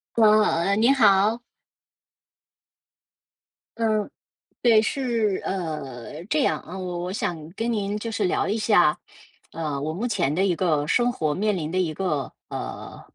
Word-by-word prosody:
啊， 210 Hz, -4 st, +4 dB
你 230 Hz, +5 st, +4 dB
好。 215 Hz, -2 st, +4 dB, 2.4 s
嗯， 215 Hz, -2 st, 0 dB, 0.5 s
对， 230 Hz, -3 st, +5 dB
是 230 Hz, -5 st, 0 dB
呃， 150 Hz, -5 st, -5 dB
这 295 Hz, +9 st, +1 dB
样 -, -, +1 dB
啊， 185 Hz, -, -9 dB
我 180 Hz, -2 st, -4 dB
我 180 Hz, +1 st, -4 dB
想 160 Hz, -6 st, -3 dB
跟 230 Hz, +5 st, -2 dB
您 205 Hz, -2 st, -1 dB
就 225 Hz, +2 st, -5 dB
是 215 Hz, -2 st, 0 dB
聊 180 Hz, -, +1 dB
一 205 Hz, +3 st, 0 dB
下， 190 Hz, -8 st, +3 dB, 0.5 s
呃， 150 Hz, -4 st, -3 dB
我 155 Hz, +2 st, -2 dB
目 200 Hz, +8 st, -3 dB
前 180 Hz, -, 0 dB
的 190 Hz, +3 st, +2 dB
一 185 Hz, -, +2 dB
个 155 Hz, -4 st, +1 dB
生 240 Hz, +8 st, +3 dB
活 155 Hz, -10 st, -1 dB
面 210 Hz, +4 st, 0 dB
临 160 Hz, -3 st, -3 dB
的 185 Hz, -, 0 dB
一 170 Hz, -4 st, 0 dB
个， 155 Hz, -6 st, -2 dB, 0.2 s
呃， -, -, -7 dB
195 Hz, 160 characters per minute, -24 LUFS, 160-220 Hz, 2.4 s, 对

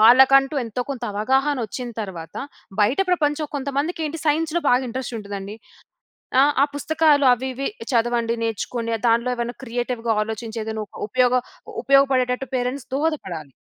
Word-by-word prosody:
వాళ్ళకంటూ 265 Hz, +5 st, +7 dB
ఎంతో 230 Hz, +2 st, -3 dB
కొంత 250 Hz, -3 st, -5 dB
అవగాహన 265 Hz, +7 st, +1 dB
వచ్చిన 245 Hz, +4 st, -5 dB
తరువాత 170 Hz, -5 st, -8 dB, 0.5 s
బయట 235 Hz, -, +2 dB
ప్రపంచం 300 Hz, -3 st, +1 dB
కొంతమందికి 285 Hz, +5 st, -2 dB
ఏంటి 320 Hz, +2 st, -5 dB
సైన్స్‌లో 325 Hz, +3 st, +1 dB
బాగా 250 Hz, +1 st, +4 dB
ఇంట్రెస్ట్ 250 Hz, 0 st, -4 dB
ఉంటదండి. 200 Hz, 0 st, -6 dB, 0.8 s
ఆహ్, 290 Hz, +1 st, +5 dB
ఆ -, -, 0 dB
పుస్తకాలు 300 Hz, -1 st, +3 dB
అవి 260 Hz, +2 st, -5 dB
ఇవి 275 Hz, +2 st, -2 dB, 0.2 s
చదవండి 235 Hz, 0 st, +1 dB
నేర్చుకొని 230 Hz, +1 st, -2 dB
దాంట్లో 235 Hz, +2 st, +2 dB
ఏమైనా 240 Hz, 0 st, -3 dB
క్రియేటివ్‌గా 240 Hz, -1 st, -1 dB
ఆలోచించి 220 Hz, +1 st, -5 dB
ఏదైనా 220 Hz, -1 st, -3 dB
ఒక -, -, -13 dB
ఉపయోగ 250 Hz, +2 st, +3 dB, 0.5 s
ఉపయోగపడేటట్టు 265 Hz, -2 st, +3 dB
పేరెంట్స్ 250 Hz, +1 st, -2 dB
దోహదపడాలి. 190 Hz, -, -2 dB
250 Hz, 135 wpm, -22 LUFS, 225-275 Hz, 0.8 s, వాళ్ళకంటూ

